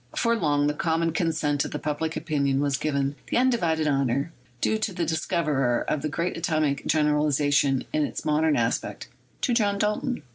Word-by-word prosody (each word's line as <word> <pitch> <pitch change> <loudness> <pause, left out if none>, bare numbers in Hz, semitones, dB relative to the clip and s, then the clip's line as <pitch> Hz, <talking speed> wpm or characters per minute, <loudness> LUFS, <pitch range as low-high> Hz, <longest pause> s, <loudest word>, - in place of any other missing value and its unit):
For 235 0 +2
long 145 -7 +1
the 150 - +1
common 165 +2 0
consent 155 -4 0
of - - -4
public 155 +1 -2
opinion 140 -4 0
has 140 -1 +1
given 140 -1 -1
the - - 0
undivided 175 -12 +2
honor, 140 +2 0 0.3
due 220 - +1
to 215 - -1
the 175 -2 -2
discoverer 150 -6 0
of 150 - 0
the 155 - -2
great 170 +4 -2
atomic 155 -4 -1
general 150 -1 +2
ization 145 -2 +2
in 155 - +2
its - - -4
modern 155 0 +2
aspect, 115 -1 -2 0.3
to 250 - +1
John 205 -4 +2
Dalton. 210 +5 -1
155 Hz, 175 wpm, -25 LUFS, 145-170 Hz, 0.3 s, For